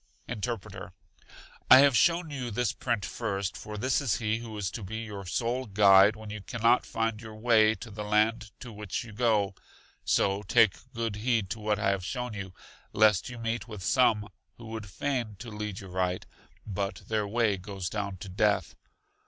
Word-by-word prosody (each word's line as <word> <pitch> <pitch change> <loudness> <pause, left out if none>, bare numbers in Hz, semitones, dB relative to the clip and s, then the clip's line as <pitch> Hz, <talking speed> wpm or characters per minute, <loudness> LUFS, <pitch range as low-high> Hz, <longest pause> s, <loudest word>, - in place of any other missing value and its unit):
Interpreter. 110 -1 -5 0.8
I 130 - +11
have 140 -2 +5
shown 170 +3 +3
you 130 -4 -4
this 120 +2 0
print 115 -7 -2
first, 95 +3 -3
for 105 0 -7
this 130 +6 +1
is 115 -10 +1
He 110 0 -1
who 115 -2 -8
is 100 -2 -2
to 115 - -6
be 105 +3 -5
your 100 -4 -7
sole 120 +6 -1
guide 100 0 +6
when 110 -1 -9
you 105 -1 -6
can 115 +3 -7
not 120 +2 +4
find 115 -1 -2
your 110 -1 -9
way 110 -1 +4
to 110 +2 -10
the 105 +1 -5
land 110 +1 +1
to 120 -3 -8
which 105 -2 -4
you 115 -2 -11
go; 105 -3 +2 0.5
so 100 +1 +2
take 110 0 +2
good 115 -3 -2
heed 110 -3 0
to 115 - -3
what 105 -1 0
I 100 - +1
have 95 -2 -2
shown 125 +3 -4
you, 100 -3 -6 0.4
lest 105 0 +4
you 125 - -8
meet 115 +1 -3
with 105 -5 -8
some 110 -4 +3 0.3
who 115 - -11
would 110 -2 -6
feign 120 +1 -2
to 115 +3 -9
lead 105 -2 -5
you 95 - -10
right; 90 0 -2 0.4
but 100 -1 -4
their 110 -2 0
way 110 -1 +1
goes 95 -1 -6
down 100 -1 -3
to - - -8
death. 95 +1 +1
110 Hz, 195 wpm, -29 LUFS, 100-115 Hz, 0.8 s, I